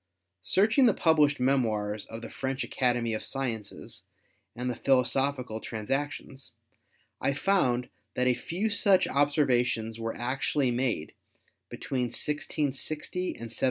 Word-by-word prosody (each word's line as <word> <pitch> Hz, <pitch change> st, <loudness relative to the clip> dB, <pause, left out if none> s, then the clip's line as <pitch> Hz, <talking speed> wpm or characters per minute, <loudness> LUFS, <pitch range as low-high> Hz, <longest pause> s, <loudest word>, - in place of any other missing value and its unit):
Searching 220 Hz, -, +4 dB
the 220 Hz, -, +3 dB
published 150 Hz, -3 st, +3 dB
memoirs 110 Hz, -6 st, 0 dB
of 115 Hz, +1 st, -9 dB
the -, -, -6 dB
French 135 Hz, 0 st, -3 dB
Academy 120 Hz, -3 st, 0 dB
of 110 Hz, -, -3 dB
Sciences 115 Hz, -7 st, -5 dB, 0.5 s
and 125 Hz, +1 st, -4 dB
the 125 Hz, -, -1 dB
Philosophical 130 Hz, -2 st, +1 dB
Transactions, 135 Hz, +4 st, -4 dB, 0.7 s
I 140 Hz, -, +1 dB
found 140 Hz, -8 st, +2 dB, 0.3 s
that 125 Hz, -, +1 dB
a 125 Hz, -, +4 dB
few 185 Hz, -, -2 dB
such 195 Hz, -2 st, +4 dB
observations 125 Hz, -6 st, +1 dB
were 115 Hz, 0 st, -3 dB
actually 130 Hz, +2 st, 0 dB
made 120 Hz, -10 st, -1 dB, 0.6 s
between 130 Hz, -2 st, -2 dB
1660 150 Hz, +3 st, -3 dB
and 115 Hz, -11 st, -4 dB
1700. 115 Hz, -, -4 dB
130 Hz, 125 wpm, -28 LUFS, 115-145 Hz, 0.7 s, Searching